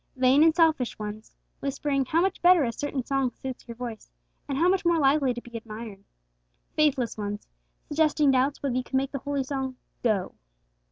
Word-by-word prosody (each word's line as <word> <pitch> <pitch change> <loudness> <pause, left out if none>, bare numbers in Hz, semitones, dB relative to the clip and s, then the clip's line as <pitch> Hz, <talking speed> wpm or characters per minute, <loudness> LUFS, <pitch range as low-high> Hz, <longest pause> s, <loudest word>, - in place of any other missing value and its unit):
Vain 260 +2 +4
and 320 -1 +5
selfish 320 -7 +2
ones 215 +1 -7 0.2
whispering 275 0 -1
how 320 +6 +2
much 385 +1 0
better 350 -2 +6
a 235 - 0
certain 275 0 -3
song 270 -2 +1
suits 255 +1 -8
your 235 - -7
voice, 235 -2 -7 0.4
and 275 - -2
how 335 +4 +3
much 375 0 +2
more 340 -1 +3
likely 275 -2 +3
to 240 0 -5
be 240 -1 -13
admired. 220 -3 -8 0.7
Faithless 275 -7 +1
ones 205 0 -4 0.4
suggesting 300 -2 +3
doubts 265 +3 +1
whether 275 -3 0
you 255 - 0
can 265 - -1
make 270 +1 -1
the 275 - -4
holy 280 0 -2
song 265 -1 -3 0.3
'go.' 210 -6 0
265 Hz, 185 wpm, -26 LUFS, 240-295 Hz, 0.7 s, better